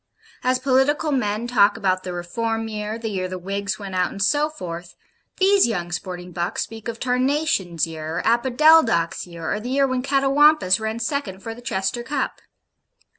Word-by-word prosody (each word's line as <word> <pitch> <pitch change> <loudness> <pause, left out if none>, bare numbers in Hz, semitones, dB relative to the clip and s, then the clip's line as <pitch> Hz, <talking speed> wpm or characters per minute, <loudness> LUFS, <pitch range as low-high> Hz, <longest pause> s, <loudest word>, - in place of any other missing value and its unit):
As 255 0 +2
political 270 +4 +2
men 220 -4 0
talk 220 -3 +3
about 185 -3 0
'the 185 - -6
Reform 225 +6 -3
year,' 215 0 -4
'the 230 -1 -5
year 185 -3 -2
the 185 0 -5
Whigs 195 +1 -3
went 195 -2 -7
out,' 180 -1 +1
and - - -9
so 290 +9 +2
forth, 175 - -8 0.4
these 390 -2 +5
young 175 -6 -3
sporting 180 0 -5
bucks 175 +4 -2
speak 225 0 -9
of 230 -1 -5
TARNATION'S 250 - 0
year, 160 0 -5
or - - -2
OPODELDOC'S 240 - +4
year, 170 -2 -4
or 210 - -2
the 235 +3 -6
year 275 +1 +3
when 255 -1 -1
CATAWAMPUS 275 -5 +4
ran 220 +1 -3
second 230 -6 -3
for 225 - -5
the 240 - -12
Chester 195 0 -2
Cup. 265 +3 -3
225 Hz, 180 wpm, -22 LUFS, 185-260 Hz, 0.4 s, these